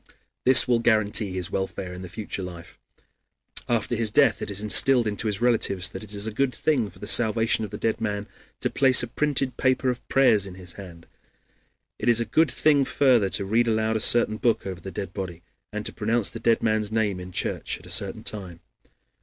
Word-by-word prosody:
This 130 +1 +7
will 120 -2 +2
guarantee 110 -3 +1
his 90 -1 -1
welfare 95 -1 -4
in 90 - -9
the 90 - -8
future 100 +1 -5
life. 90 -2 -10 0.9
After 120 0 -1
his 115 -2 +1
death - - +3
it - - -5
is 100 -1 -2
instilled 120 +4 +4
into 105 +1 -2
his 105 0 -2
relatives 100 -6 +1
that - - -8
it 105 - -11
is 100 +1 0
a 110 - -3
good 130 +1 -1
thing 130 -9 0
for 90 - -19
the - - -9
salvation 110 0 +3
of 105 - -5
the 105 - -7
dead 110 +1 -2
man 105 -2 -3 0.3
to - - -1
place 130 -3 +5
a - - -3
printed 135 0 -1
paper 130 0 +1
of 125 - -9
prayers 110 -7 +3
in 90 - -10
his 90 -2 -9
hands; 85 -4 -12 0.9
it - - 0
is 120 -1 +4
a 115 - -1
good 155 +8 +2
thing 145 +1 +2
further 125 -7 +2
to 100 - -2
read 115 +4 +1
aloud 110 0 0
a - - 0
certain 110 -1 +3
book 115 0 0
over 95 -2 -6
the 95 - -7
dead 95 +1 -6
body, 85 -4 -7 0.3
and 105 0 -5
to - - -3
pronounce 110 0 -1
the - - -7
dead 115 -1 +1
man's 110 -1 0
name 105 -4 -1
in 90 0 -9
church - - -3
at - - -16
a - - -12
certain - - -2
time. 95 -5 -7
110 Hz, 220 wpm, -24 LUFS, 95-120 Hz, 0.9 s, This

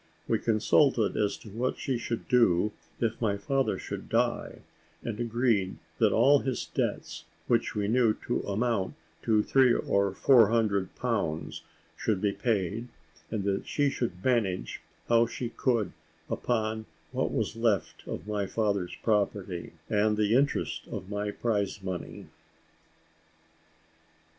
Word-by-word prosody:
We - - +2
consulted 115 +2 +3
as 105 -1 0
to 110 - -11
what 120 +5 -2
she 130 -3 -2
should 115 -1 -4
do 105 -5 +4 0.3
if 115 0 -1
my 105 -3 +1
father 135 +6 0
should - - -6
die, - - 0 0.4
and 115 -2 -4
agreed 115 -5 +1 0.2
that - - +4
all 145 +1 +5
his 130 -2 -2
debts, - - -3 0.2
which 115 -1 +1
we 105 -1 0
knew 115 -1 +3
to - - 0
amount 100 -1 0 0.3
to 110 -2 +3
three 130 -3 +4
or 100 -1 +1
four 120 0 +6
hundred 105 -5 +1
pounds, 100 -11 -2 0.3
should 105 -4 0
be 100 +1 +1
paid, 105 +1 -1 0.4
and 110 -3 -2
that 100 0 -1
she 145 -1 +1
should 95 -9 -4
manage 100 - 0 0.3
how 115 0 +4
she 120 0 -4
could 115 -5 0 0.4
upon 110 -2 -1 0.2
what - - -1
was - - -1
left 115 -4 0
of - - -5
my 105 -2 -1
father's 100 -5 -1
property, 100 -5 -1
and 105 0 +2
the 105 0 +2
interest 140 +3 +1
of 95 +3 -6
my 105 0 -2
prize 100 -3 -1
money. 95 -2 -5
110 Hz, 140 wpm, -29 LUFS, 100-120 Hz, 0.4 s, four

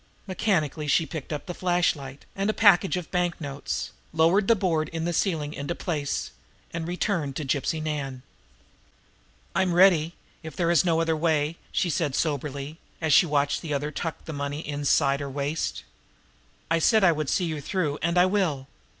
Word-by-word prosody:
Mechanically 170 -6 -1
she 160 +3 +3
picked 155 0 -7
up 150 - -4
the 175 - -5
flashlight 170 -7 -1
and 195 +2 0
a - - +2
package 195 -3 +5
of 180 - -4
the - - -29
banknotes, 170 -6 -2 0.2
lowered 170 +5 +3
the 230 - +6
board 165 -6 0
in 165 0 -3
the 175 - -1
ceiling 160 -5 0
into 145 +4 -4
place, 150 -5 -3 0.4
and 165 -1 -3
returned 175 - -1
to 150 - -3
Gypsy 140 +4 -1
Nan. 135 -4 -4 1.3
"I'm 185 -2 +1
ready, 175 -3 +5 0.3
if 160 -1 -9
there 170 -1 +1
is 170 - +4
no 165 -2 +2
other 165 -1 +1
way," 155 -1 +1 0.2
she 175 - 0
said 145 -3 -1
soberly, 145 0 -2 0.2
as 160 -3 +1
she 175 +4 +6
watched 145 -1 +1
the 150 -4 -2
other 145 +2 -2
tuck 165 +2 -5
the 160 - -6
money 145 +1 -3
away - - -10
inside 140 -1 +2
her 140 -1 -4
waist. 145 +3 -3 0.9
"I 165 - +3
said 215 +5 +4
I 175 - +7
would 155 -3 -2
see 180 - +1
you 155 -3 -3
through, 150 -3 -1
and 170 +2 0
I 180 - +6
will. 185 -9 0
160 Hz, 185 wpm, -26 LUFS, 145-175 Hz, 1.3 s, I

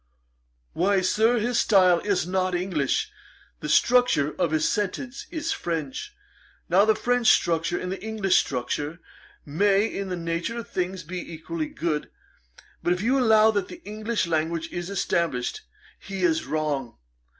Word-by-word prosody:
'Why, 190 +3 +2
Sir, 220 +6 +3
his 235 +2 +1
style 185 -4 +5
is 200 -3 0
not 185 0 0
English; 175 -7 -1 0.5
the 150 - -5
structure 240 - +3
of 175 -2 0
his 155 0 +1
sentences 230 +6 -3
is 315 -3 -3
French. 165 - -4 0.5
Now 190 +4 +4
the 220 0 +4
French 245 0 +1
structure 165 +1 +3
and 180 - -4
the 190 - -5
English 215 -4 +1
structure 145 +5 -2 0.5
may, 200 +7 +2
in 200 -3 -4
the 180 - -2
nature 170 +7 -3
of 235 - -6
things, 185 0 -3
be 175 +2 -6
equally 160 -1 -4
good. 155 -1 -3 0.7
But 175 - +2
if 180 +2 -4
you 260 +4 +2
allow 220 -2 +5
that 205 -3 -1
the 350 - -11
English 215 +1 -2
language 165 0 -1
is 175 +1 -4
established, 170 -9 -1 0.4
he 195 -1 -5
is 325 -2 +1
wrong. 145 -6 -2
185 Hz, 150 wpm, -25 LUFS, 165-215 Hz, 0.7 s, style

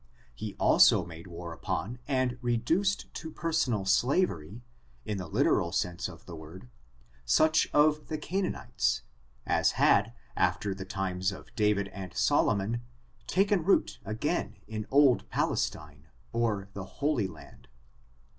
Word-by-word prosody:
He - - -6
also - - +5
made 85 +1 -10
war 85 -1 -7
upon, 100 +9 -4
and 130 -2 0
reduced 160 - 0
to 160 - -6
personal 155 - 0
slavery, 105 - +1 0.4
in 105 -2 -3
the 90 - -5
literal 85 +1 +2
sense 85 0 -1
of - - -13
the 85 - -8
word, 80 -2 -11 0.5
such 155 - +3
of 150 0 +3
the 155 - -3
Canaanites, 180 - -1 0.4
as - - +2
had, 110 +4 +3 0.2
after 95 +2 +1
the 95 0 -7
times 95 -1 -1
of 95 +4 -11
David 105 -3 +2
and 95 -2 -8
Solomon, 105 +4 +2 0.5
taken 195 -2 +2
root 195 +4 +2
again 110 +1 -2
in 110 0 -5
old 140 -3 +4
Pal - - +1
estine 75 -1 -4 0.3
or 110 -4 0
the 100 -2 -6 0.2
Holy 140 -9 +2
Land. - - -14
105 Hz, 135 wpm, -29 LUFS, 90-140 Hz, 0.5 s, also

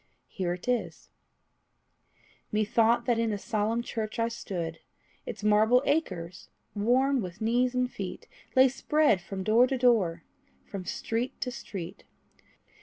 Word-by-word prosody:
Here 180 -3 -2
it 180 +5 -9
is: 245 -1 -2 1.4
Methought 225 +2 +2
that 235 -2 +2
in 230 -1 +1
a 205 - -1
solemn 220 +3 -1
church 220 -2 -4
I 230 0 +1
stood. 170 -8 -5 0.5
Its 210 -1 -6
marble 215 +4 +4
acres, 185 - -2 0.2
worn 255 +5 +2
with 180 -1 -7
knees 245 +3 +1
and 250 0 +2
feet, 190 -2 -6 0.3
Lay 260 +1 +7
spread 280 - +2
from, 190 +1 -5
door 225 +5 +5
to 265 - -1
door, 210 -10 +2 0.4
from 195 -3 -7
street 230 +7 -3
to 250 - -2
street. 190 -6 -7
220 Hz, 135 wpm, -28 LUFS, 195-245 Hz, 1.4 s, Lay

